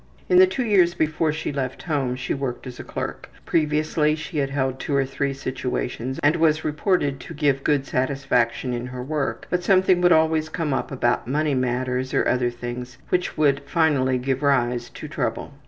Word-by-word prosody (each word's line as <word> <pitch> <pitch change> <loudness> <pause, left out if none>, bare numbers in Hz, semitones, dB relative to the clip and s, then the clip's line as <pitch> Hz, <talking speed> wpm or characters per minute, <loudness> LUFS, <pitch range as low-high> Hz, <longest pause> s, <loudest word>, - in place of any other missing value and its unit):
In 365 -1 +6
the 375 - +8
two 270 -9 -2
years 185 -5 +4
before 155 0 +1
she 155 0 -3
left 135 -2 -3
home 140 -7 -1
she 130 - -3
worked 135 -3 -4
as 125 -2 -8
a - - -5
clerk. - - -5 0.2
Previously 155 -1 +1
she 155 0 -4
had 135 -1 0
held 130 -1 -1
two 140 - -2
or 135 -1 +2
three 140 +1 -2
situations 130 -1 -3
and 150 +4 +4
was 160 -1 +2
reported 150 -3 0
to - - -9
give 140 -2 +1
good 145 -2 +1
satisfaction 130 -2 0
in 120 +1 -3
her 125 0 -6
work, 150 +1 -2
but 180 0 0
something 185 -1 +4
would 175 0 +5
always 160 -1 +3
come 160 -4 -2
up - - -2
about 120 -3 0
money 150 +2 +1
matters, 130 0 -1
or - - +2
other 125 -1 +2
things, 120 +1 -7
which 180 0 0
would 145 -2 +3
finally 140 -5 +2
give 130 +1 -1
rise 125 -4 +1
to - - -9
trouble. - - -3
140 Hz, 190 wpm, -23 LUFS, 130-155 Hz, 0.2 s, the